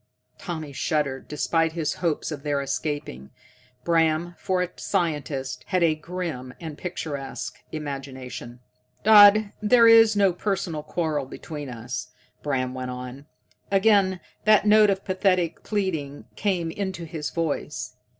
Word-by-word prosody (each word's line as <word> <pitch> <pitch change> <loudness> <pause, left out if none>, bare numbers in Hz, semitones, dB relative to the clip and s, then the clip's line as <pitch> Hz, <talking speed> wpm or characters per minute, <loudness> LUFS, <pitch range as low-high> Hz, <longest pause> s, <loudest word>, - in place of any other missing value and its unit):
Tommy 155 -5 -6
shuddered, 140 -1 -1
despite 160 +3 0
his 160 -3 -1
hopes 165 -2 -1
of 145 -2 -5
their 145 -1 -1
escaping. 140 - -4 0.5
Bram, 165 0 +2
for 185 -1 0
a 180 - -4
scientist, 150 -7 -2
had 185 -1 +1
a 165 -2 +4
grim 155 -6 -6
and 160 -3 -7
picturesque 150 -5 -5
imagination. 130 -5 -7 0.4
"Dodd, 210 -1 +8
there 230 +2 +6
is 225 -1 +7
no 200 -3 +4
personal 180 -4 -2
quarrel 155 -3 -2
between 145 0 -7
us," 120 +1 -5 0.3
Bram 130 -3 -1
went 130 -1 -5
on. 125 +3 -7 0.4
Again 195 -2 +3 0.3
that 215 -1 +5
note 210 0 +6
of 195 0 -1
pathetic 185 -3 +1
pleading 160 -9 -3
came 180 -5 -1
into 190 -2 -4
his 155 -2 -4
voice. 165 -3 -3
160 Hz, 130 wpm, -25 LUFS, 140-190 Hz, 0.5 s, Dodd